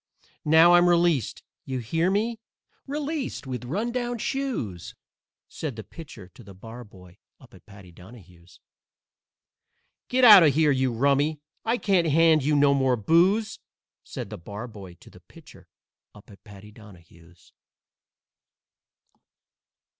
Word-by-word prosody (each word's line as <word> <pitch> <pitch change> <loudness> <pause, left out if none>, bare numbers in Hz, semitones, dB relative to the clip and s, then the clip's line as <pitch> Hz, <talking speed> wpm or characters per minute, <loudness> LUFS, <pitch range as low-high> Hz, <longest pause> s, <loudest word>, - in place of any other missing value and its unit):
Now 160 +3 +5
I'm 175 0 +5
released 170 - 0 0.2
you 130 -1 -5
hear 160 +9 -1
me? 220 +4 -2 0.5
Released 290 - -5
with 125 -1 -6
run 205 - -3
down 245 -1 -3
shoes!" 225 - -5 0.5
Said 150 -7 -7
the 110 - -8
Pitcher 145 - -13
to 120 - -17
the 100 -2 -14
Barboy 100 -4 -14 0.2
up - - -20
at - - -19
Paddy 100 -3 -15
Donahue's. 90 -2 -17 1.5
_"Get 255 +1 0
out 210 -6 +10
of 150 -5 +3
here, 155 -1 +3
you 130 -1 0
rummy! 140 +5 0 0.2
I 230 +2 0
can't 190 -7 +1
hand 160 -1 +3
you 150 +2 +1
no 145 -1 +3
more 130 -2 +1
booze!" 185 - +1 0.4
Said - - -8
the - - -8
Barboy 100 -1 -10
to - - -17
the - - -17
Pitcher - - -18 0.5
up 105 +1 -17
at 100 - -18
Paddy 105 -1 -14
Donahue's. 85 -5 -19
140 Hz, 130 wpm, -24 LUFS, -, 1.5 s, out